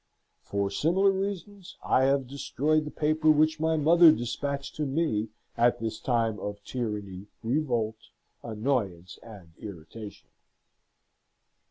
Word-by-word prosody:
For 100 -1 -2
similar 185 - +3
reasons, 195 0 -5
I 130 - +3
have 135 0 +2
destroyed 145 +3 0
the - - -4
paper 155 +1 +1
which 155 +1 +4
my 160 0 +1
mother 165 +2 +7
despatched 140 +2 -3
to 150 -1 -1
me 135 -7 0 0.3
at 120 +1 +3
this 110 -1 -4
time 115 -4 0
of 105 0 -5
tyranny, 105 -6 -5 0.2
revolt, 120 -4 0 0.4
annoyance, 105 -7 -2
and 100 -8 -13
irritation. 100 +2 -10
130 Hz, 120 wpm, -28 LUFS, 105-155 Hz, 0.4 s, mother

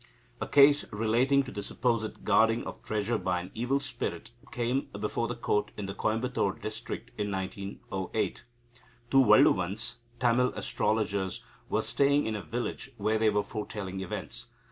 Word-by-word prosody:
A - - -2
case 145 +1 +6
relating 120 +6 +3
to 130 - -8
the 105 - -4
supposed 115 -1 -1
guarding 115 +1 +4
of - - -7
treasure 110 +1 -1
by 90 -1 0
an 90 - -8
evil 125 +5 0
spirit 125 -9 -4 0.2
came 125 +3 -1
before 110 +2 -1
the 120 - -3
Court 105 -3 0
in 105 - -3
the 95 - -4
Coimbatore 110 -2 0
district 110 +1 -5
in 105 0 0
1908. 95 +1 -3 0.7
Two 135 0 +7
Valluvans 105 0 +4 0.2
(Tamil 125 +1 +3
astrologers) 100 -3 -1 0.3
were - - +1
staying 140 +1 +3
in 110 0 -1
a 105 - -3
village, 120 +4 -4
where 110 +2 +1
they 110 0 +4
were 105 0 +1
foretelling 100 -2 -5
events. 105 +5 -6
110 Hz, 150 wpm, -29 LUFS, 100-120 Hz, 0.7 s, Two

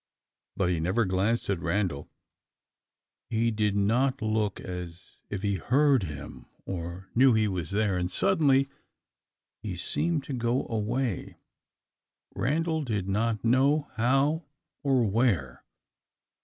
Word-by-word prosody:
but 95 - +2
he 85 - 0
never 95 +8 +1
glanced 100 +5 0
at 100 -3 0
Randal. 85 -4 -1 1.2
He 115 +1 +1
did 105 -2 0
not 125 +7 +2
look 110 -2 -1
as 90 -2 -8
if 100 -1 -4
he 100 -1 +1
heard 135 - +3
him, 75 -3 -8 0.2
or 90 +1 -6
knew 130 0 +5
he 110 -1 +3
was 90 -5 -3
there, 100 -2 +1
and 90 0 -1
suddenly 140 - +3 0.9
he 105 -5 -4
seemed 155 - -1
to 140 - -6
go 120 +1 0
away, 115 -1 -2 1.0
Randal 160 +5 0
did 105 -7 -2
not 110 +3 0
know 140 +5 +3
how 135 +7 +2 0.4
or 135 -4 +2
where. 95 - 0
110 Hz, 125 wpm, -28 LUFS, 95-130 Hz, 1.2 s, knew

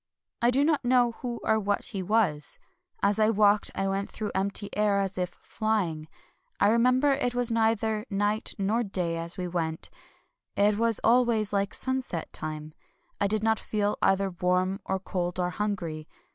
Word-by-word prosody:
I 235 - +4
do 265 +3 +3
not 310 -3 +1
know 245 -1 +3
who 240 0 -5
or 220 - +2
what 205 -1 -1
he 195 - -4
was. 185 -7 0 0.5
As 200 +2 +2
I 215 0 +4
walked 205 -1 +3
I 195 - -1
went 195 +1 -2
through 215 -1 -4
empty 200 +1 -1
air 205 -1 +2
as 195 -1 -1
if 180 -1 -1
flying. 180 -10 -2 0.5
I 200 - +5
remember 255 +5 +4
it 245 -3 -1
was 245 -1 +1
neither 220 0 +1
night 205 +1 -1
nor 210 +4 +1
day 180 -6 -2
as 170 +1 -2
we 180 -1 -3
went: 165 -2 -2 0.6
it 205 +1 +3
was 230 -1 +2
al 245 +3 +5
ways 220 -4 0
like 200 0 0
sunset 260 -10 -2
time. 155 0 -5 0.5
I 200 - +2
did 215 +1 0
not 225 -1 +2
feel 210 -1 -1
either 195 0 +2
warm 180 +2 0
or 190 - 0
cold 180 -1 -3
or 180 0 0
hungry. 175 -7 -3
205 Hz, 175 wpm, -27 LUFS, 185-225 Hz, 0.6 s, I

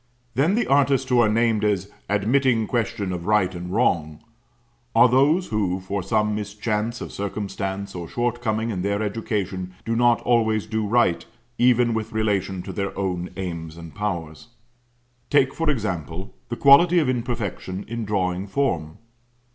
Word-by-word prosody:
Then 155 +9 +2
the 240 - +1
artists 135 -1 +3
who 125 -1 +4
are 115 -2 +5
named 115 -1 +2
as 100 -1 0 0.2
"admitting 115 +3 +2
question 105 -5 -2
of 85 -1 -5
right 105 -4 +2
and 90 0 -6
wrong," 85 -8 0 0.7
are 115 +2 +7
those 145 +9 +3
who 95 -4 0
from 95 +1 -3
some 105 +3 +1
mischance 105 +2 -3
of - - -6
circumstance 100 -1 -4
or 85 -2 -6
short 120 0 -1
coming 110 0 -1
in 95 -4 -3
their 100 +2 -1
education, 100 -4 -3
do 115 - -1
not 120 0 +4
always 110 -3 +2
do 110 -1 -2
right, 110 -6 +2 0.4
even 120 -1 +4
with 110 -1 -3
relation 100 -4 -1
to - - -7
their 100 -1 -3
own 90 -2 -2
aims 85 -3 -5
and 85 -2 -10
powers. 90 -4 -4 0.8
Take 135 -2 +3
for 165 -1 -1
example 95 - -3 0.2
the 120 - -3
quality 165 +6 +6
of 155 -5 +3
imperfection 115 -6 -3
in 115 +1 -4
drawing 95 -2 -1
form. 85 - -1
105 Hz, 155 wpm, -23 LUFS, 95-120 Hz, 0.8 s, are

